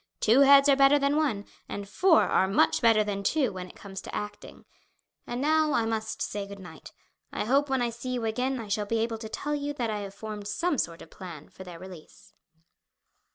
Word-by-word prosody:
Two 225 +5 +4
heads 280 0 +7
are 280 - +6
better 275 +1 +5
than 280 0 +1
one, 260 -10 0 0.2
and 200 0 -5
four 345 - +4
are 190 - +2
much 195 - +2
better 225 -2 +5
than 205 -1 -3
two 255 +2 +1
when 185 -1 -6
it - - -15
comes 195 -1 -8
to - - -8
acting. 210 0 -7 0.6
And 240 +1 -4
now 310 +1 +2
I 230 - +2
must 220 -1 -3
say 200 -1 -4
good 200 0 -9
night. 175 -4 -12 0.4
I - - -3
hope 275 +5 +2
when 265 -2 +1
I 240 - -1
see 235 +2 -7
you 245 -2 -2
again 255 +4 -1
I 225 - -7
shall 205 +1 -1
be 230 - 0
able 225 0 -1
to 220 -1 -7
tell 290 +6 -3
you 290 0 -2
that 240 -5 -2
I 210 - -3
have 200 -1 -7
formed 210 -1 -7
some 325 +6 -1
sort 170 0 -3
of 160 - -17
plan 170 -5 -10
for 190 - -12
their 180 -2 -10
release." 180 -3 -13
225 Hz, 225 wpm, -27 LUFS, 200-275 Hz, 0.6 s, heads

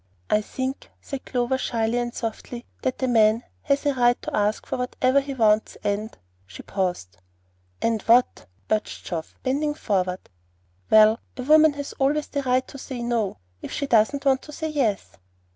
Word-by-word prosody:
"I 210 - +4
think;" 260 +5 -5
said 275 -2 -7
Clover, 250 +1 0
shyly 230 -1 0
and 240 0 -2
softly, 235 +1 -6 0.2
"that 260 0 -2
a - - +2
man 225 -1 +4 0.2
has 280 0 0
a 285 - +3
right 245 -1 +3
to - - -3
ask 210 +1 0
for - - -3
whatever 255 +2 +2
he 275 0 -6
wants, 215 -3 +2
and 205 +2 -1 0.2
" 90 +1 -38
she 90 -1 -11
paused. 180 - -3 0.7
"And 225 -2 +1
what?" 235 - +3 0.2
urged 215 -1 -1
Geoff, 165 -3 -5
bending 295 +3 0
forward. 185 -7 -1 0.6
"Well, 215 +1 +6 0.2
a 250 - -4
woman 310 +2 +6
has 285 0 -6
always 290 +2 +2
the 285 - -2
right 255 -1 +1
to 275 - -10
say 255 -2 -6
no, 230 -5 -1 0.2
if - - -7
she 280 - -2
doesn't 270 +3 +2
want 265 -1 +3
to 300 - -11
say 315 +1 -4
yes." 250 -10 -1
245 Hz, 175 wpm, -24 LUFS, 215-275 Hz, 0.7 s, Well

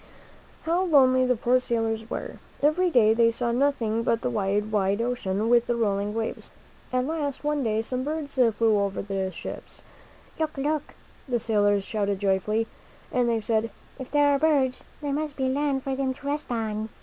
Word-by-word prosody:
How 335 +3 +1
lonely 260 -6 +4
the 250 - +3
poor 245 +3 +2
sailors 225 -2 -2
were! - - -5 0.2
Every 345 +5 +3
day 220 -8 +5
they 230 0 +4
saw 235 +1 -1
nothing 235 -4 +1
but 230 0 0
the 250 - 0
wide, 210 0 0
wide 200 -1 +1
ocean, 225 -4 -1
with 240 0 +4
the 240 - +1
rolling 205 -2 0
waves. 225 0 -3 0.4
At 255 0 +1
last, 295 -3 -3
one 295 -1 0
day, 220 -1 0
some 255 +2 -3
birds 300 0 -4
flew 225 -4 +3
over 200 -1 -1
the 195 -1 -2
ships. - - -8 0.6
"Look! 310 -2 -2
Look!" 295 +2 -2 0.3
the 245 -2 +1
sailors 205 -3 +2
shouted 200 -1 -1
joyfully. 200 +3 +1 0.5
And 245 -1 +1
they 230 -1 +1
said, 220 +1 0 0.3
"If 260 - -7
there 290 -1 +3
are 280 - +2
birds, 275 -5 +2 0.2
there 285 -1 -1
must 300 0 -2
be 265 -1 0
land 275 0 0
for 270 -1 -2
them 260 -1 -1
to 280 - -15
rest 295 +2 -2
on." 220 -2 -2
240 Hz, 185 wpm, -26 LUFS, 215-275 Hz, 0.6 s, day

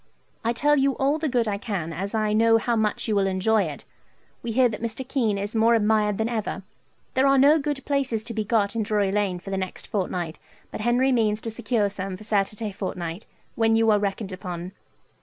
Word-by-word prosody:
I 230 - +1
tell 295 +5 +2
you 270 -1 +2
all 280 +3 +1
the 310 -1 -1
good 240 -3 +1
I 200 -1 -1
can, 190 -7 -3
as 195 +6 -4
I 215 -1 +1
know 225 +1 +5
how 235 +1 0
much 220 0 0
you 215 - +1
will 195 -1 +2
enjoy 195 +2 +2
it. 150 -3 -7 0.6
We 235 - -4
hear 250 +2 +4
that 220 -2 -6
Mr. 230 +3 -4
Kean 230 -8 0
is 205 +3 -3
more 225 +1 +4
admired 210 -2 +2
than 220 - 0
ever. 215 -4 -3 0.5
There 265 +1 +3
are 275 0 +5
no 290 +4 +6
good 285 -2 -3
places 265 -6 0
to 230 - -6
be 215 -1 -1
got 210 -1 +1
in 225 - 0
Drury 205 -2 +1
Lane 200 -3 0
for 195 +2 -9
the 195 - -1
next 185 -1 -5
fortnight, 180 -5 -3 0.3
but - - -5
Henry 245 +4 +2
means 215 -4 +2
to 225 - -4
secure 220 -1 0
some 195 -1 -4
for 215 - -12
Saturday 210 0 -1
fortnight, 180 -1 -5 0.3
when 225 -1 +2
you 225 0 +4
are 210 - +4
reckoned 200 0 -3
upon. 180 -1 -6
215 Hz, 220 wpm, -25 LUFS, 200-235 Hz, 0.6 s, no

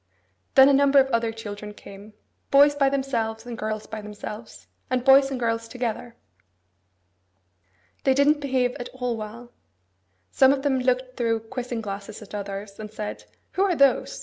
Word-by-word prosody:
Then 265 0 +9
a 280 - +5
number 280 0 +4
of 270 -1 +5
other 230 -1 +1
children 210 -2 -8
came; 200 +2 -13 0.4
boys 285 +1 +6
by 280 -1 +2
themselves, 235 -5 -2
and 240 -1 -6
girls 215 -1 -4
by 220 -1 -7
themselves, 210 +1 -9 0.2
and 255 -1 -1
boys 270 0 +6
and 265 -2 -4
girls 230 -1 -1
together. 240 -1 -4 1.9
They 265 -1 +3
didn't 290 +2 +3
behave 255 -3 0
at 245 - -6
all 250 -2 -2
well. 225 +3 -8 0.8
Some 265 +1 +5
of 270 -1 -3
them 270 -3 +1
looked 255 0 -1
through 230 -2 0
quizzing 240 +1 -5
glasses 200 0 -7
at 210 - -15
others, 200 0 -6
and 215 -1 -7
said, 210 -1 -6 0.3
'Who 375 - -2
are 390 -3 +2
those? 275 -3 +2
240 Hz, 165 wpm, -24 LUFS, 215-270 Hz, 1.9 s, Then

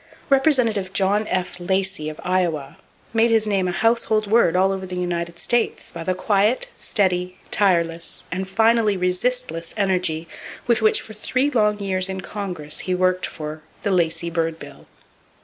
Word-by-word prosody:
Representative 245 -9 +2
John 205 +2 +2
F. 185 -1 -2
Lacey, 190 -3 -1
of 155 - -9
Iowa, 170 -6 -1 0.3
made 230 +1 +4
his 225 -1 +3
name 195 -3 +1
a - - 0
household 220 +1 +1
word 205 -5 +3
all 190 +1 +3
over 190 -1 -4
the 180 - -6
United 170 -1 -3
States 240 +6 0
by 165 - -6
the 185 +2 -1
quiet, 210 - +1
steady, 180 -3 0
tireless 170 -4 +1
and 190 +2 -3
finally 220 0 +3
resistless 180 -1 -1
energy 180 -5 0 0.4
with 235 -1 +2
which 215 - +4
for 215 - -11
three 255 +6 0
long 210 -4 +2
years 190 -2 0
in 190 0 -4
Congress 180 -8 -4
he 185 - -1
worked 185 0 +1
for 155 0 -7 0.2
"the 200 - 0
Lacey 170 -2 0
bird 165 -1 -1
bill." - - -12
190 Hz, 160 wpm, -22 LUFS, 175-215 Hz, 0.4 s, made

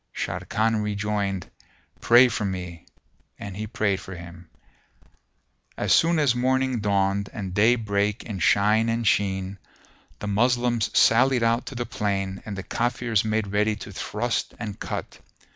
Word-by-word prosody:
Sharrkan 110 0 -1
rejoined, 100 -2 -2 0.5
"Pray 120 +2 +6
for 115 -2 -3
me," 90 -4 -5 0.5
and 100 -2 -7
he 105 +2 -5
prayed 100 -3 0
for 95 - -9
him. 85 0 -11 1.3
As - - +2
soon 165 0 +4
as 145 -6 +3
morning 130 0 +1
dawned 100 -1 0
and 95 -4 -6
day 110 +5 +4
brake 105 -2 -1
in 105 -4 -6
shine 105 +7 +3
and 115 0 -1
sheen, 95 -1 0 0.6
the - - -7
Moslems 120 +2 +1
sallied 125 +1 +4
out 115 +2 +1
to 135 - -7
the 120 0 -3
plain 95 -3 -2
and 100 -2 -5
the 95 - -5
Kafirs 120 -2 0
made 110 -1 0
ready 105 +1 +1
to 105 +1 -9
thrust 110 +4 -3
and 105 -4 -6
cut. - - -5
105 Hz, 145 wpm, -25 LUFS, 100-115 Hz, 1.3 s, Pray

